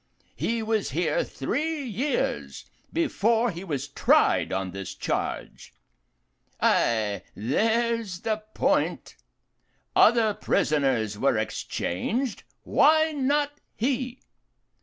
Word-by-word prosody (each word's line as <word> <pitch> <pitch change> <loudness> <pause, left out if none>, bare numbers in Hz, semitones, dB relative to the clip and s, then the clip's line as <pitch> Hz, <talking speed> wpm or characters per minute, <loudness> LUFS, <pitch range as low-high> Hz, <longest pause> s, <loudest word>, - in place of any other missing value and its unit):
He 230 -1 -1
was 220 -2 0
here 165 +5 0
three 295 - -2
years 255 +4 -2 0.3
before 235 -8 +1
he 175 +1 -7
was 145 -6 -3
tried 140 - +3
on 95 -1 -2
this 95 0 -6
charge. - - -4 0.8
Ay, 110 -3 +2
there's 220 - 0
the 220 -1 0 0.2
point. - - 0 0.8
Other 225 -2 +5
prisoners 135 - 0
were - - +2
exchanged 235 - -2 0.2
why 315 +2 +4
not 290 0 +1 0.2
he? 255 +1 -2
220 Hz, 95 wpm, -26 LUFS, -, 0.8 s, Other